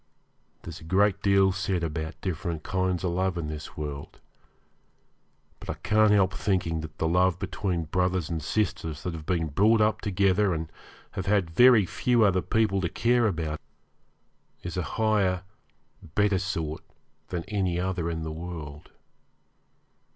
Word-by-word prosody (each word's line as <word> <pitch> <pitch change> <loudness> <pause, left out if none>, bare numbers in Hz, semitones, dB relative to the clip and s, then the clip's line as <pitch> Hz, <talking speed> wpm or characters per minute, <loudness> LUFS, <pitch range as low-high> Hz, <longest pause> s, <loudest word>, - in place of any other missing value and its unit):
There's 85 -1 -8
a - - -12
great 100 +4 +2
deal 100 -1 +4
said 95 -2 -1
about 80 0 -4
different 85 -3 -3
kinds 95 -1 -1
of 90 - 0
love 95 0 0
in 80 -3 -3
this 75 0 -7
world, 75 -2 -6 1.4
but - - -11
I - - -2
can't 110 0 +3
help 95 -3 +4
thinking 85 -5 0
that 80 0 -9
the 80 - 0
love 90 +2 +3
between 90 -2 -2
brothers 90 +1 0
and 80 -2 -3
sisters 80 -4 -2
that 90 - -3
have 80 -2 -8
been 85 -3 0
brought 105 +9 +4
up 105 0 +2
together 100 -1 +2
and 80 0 -5 0.4
have 95 0 -5
had 100 -5 +2
very 120 +2 +6
few 120 +5 +2
other 95 -3 +3
people 105 -2 +1
to 85 - -1
care 120 +3 +2
about 80 -5 -3 1.0
is 90 -2 -5
a 90 - 0 0.2
higher, 100 -5 +2 0.7
better 105 -2 +3
sort 85 -5 -3 0.5
than 90 -2 -4
any 95 -4 -1
other 90 -2 -1
in 80 -1 -3
the 80 - -4
world. 80 -3 -7
90 Hz, 155 wpm, -27 LUFS, 80-100 Hz, 1.4 s, very